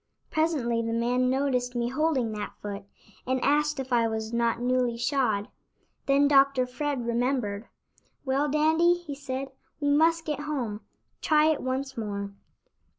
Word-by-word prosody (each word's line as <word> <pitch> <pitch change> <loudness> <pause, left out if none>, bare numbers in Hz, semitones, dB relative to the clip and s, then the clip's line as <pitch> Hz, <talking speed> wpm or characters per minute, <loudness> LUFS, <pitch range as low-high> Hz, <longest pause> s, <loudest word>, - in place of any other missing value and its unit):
Presently 285 -8 +1
the 230 0 -2
man 245 +2 +1
noticed 255 -2 0
me 240 0 0
holding 265 -4 0
that 210 -1 -5
foot, 200 -1 -6 0.4
and 260 0 +1
asked 300 0 +2
if 260 -1 -4
I 230 -1 +3
was 220 0 -4
not 235 0 +1
newly 245 -1 +1
shod. 240 -5 0 0.6
Then 280 +1 +4
Dr. 275 -2 +4
Fred 270 0 -3
remembered. 235 -3 -1 0.6
"Well, 275 +2 +1
Dandy," 320 +4 +3
he 345 -4 -7
said, 270 -1 -5 0.3
"we 290 -1 0
must 325 +2 +3
get 300 -2 -2
home. 260 -8 -3 0.4
Try 310 -1 +4
it 310 - -2
once 265 +1 -3
more." 200 -2 -4
260 Hz, 150 wpm, -27 LUFS, 235-290 Hz, 0.6 s, Then